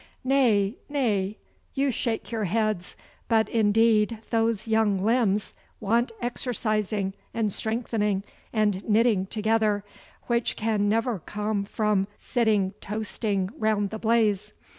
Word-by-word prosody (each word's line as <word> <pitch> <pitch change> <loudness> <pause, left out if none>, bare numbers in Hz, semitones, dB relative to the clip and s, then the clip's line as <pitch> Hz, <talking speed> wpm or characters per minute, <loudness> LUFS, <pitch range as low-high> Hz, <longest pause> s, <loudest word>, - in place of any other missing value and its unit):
Nay, 240 -6 +3
nay, 215 -8 0 0.4
you 275 0 +2
shake 230 0 -3
your 220 -2 -1
heads, 215 -1 -1 0.3
but 220 -1 +3
indeed 225 0 +3
those 225 -2 +1
young 220 -4 +2
limbs 215 -3 +1 0.3
want 230 +4 +1
exercising 215 - -1 0.2
and 215 -4 0
strengthening 220 -3 -1 0.3
and 210 -3 +1
knitting 215 -3 +3
together, 215 -1 +1 0.4
which 235 -1 0
can 215 -2 0
never 225 0 +1
come 210 +2 -2
from 210 -2 0
sitting 215 -6 +1
toasting 205 -2 -2
round 210 -2 +1
the 220 - -5
blaze. 220 -3 +1
215 Hz, 115 wpm, -26 LUFS, 205-230 Hz, 0.4 s, Nay